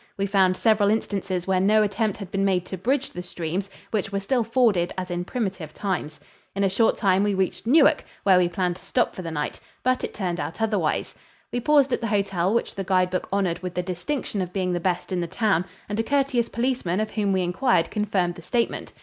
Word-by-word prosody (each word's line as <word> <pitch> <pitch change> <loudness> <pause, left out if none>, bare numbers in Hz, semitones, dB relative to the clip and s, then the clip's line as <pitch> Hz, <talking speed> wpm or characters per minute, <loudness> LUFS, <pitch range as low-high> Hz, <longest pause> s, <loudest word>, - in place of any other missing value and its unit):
We 200 - 0
found 190 -2 +3
several 215 -2 +3
instances 195 -4 -1
where 190 -1 +2
no 215 +3 +4
attempt 205 0 0
had 195 -3 -8
been 195 0 0
made 185 -2 +1
to 190 - -5
bridge 255 +9 -1
the 180 - -6
streams, 180 +2 -4 0.2
which 205 -3 -1
were 200 - 0
still 235 +5 +1
forded 220 -7 +2
as 185 -1 -4
in 175 0 -2
primitive 190 - -4
times. 175 -6 -3 0.4
In 200 - 0
a 195 - +3
short 225 +4 +2
time 190 -2 +3
we 205 -1 +1
reached 190 +3 -1
Newark, 285 +3 +5 0.2
where 190 -2 +6
we 175 -1 +2
planned 180 0 -1
to - - -17
stop - - 0
for - - -5
the 165 - -5
night 150 -2 -3 0.2
but 255 0 +1
it - - -2
turned 180 -4 -2
out 165 - -4
otherwise. 210 -8 0 0.4
We 245 - -1
paused 280 0 +3
at - - 0
the 230 - -1
hotel 195 -3 +1
which 235 - 0
the 195 - -4
guide 185 -1 +2
book 185 - -2
honored 190 -4 0
with 180 -1 -6
the 180 - 0
distinction 190 +5 -3
of 180 -1 -4
being 185 -1 -1
the 175 - 0
best 180 +2 -1
in 180 -1 0
the 170 - -2
town 185 -1 +1 0.2
and 205 +1 -3
a - - +2
courteous 270 -3 +1
policeman 235 -7 -1
of 215 0 -2
whom 205 -2 0
we 190 -1 +2
inquired 180 -1 +1
confirmed 195 -4 0
the 170 - -11
statement. 235 +7 -2
195 Hz, 230 wpm, -24 LUFS, 180-220 Hz, 0.4 s, where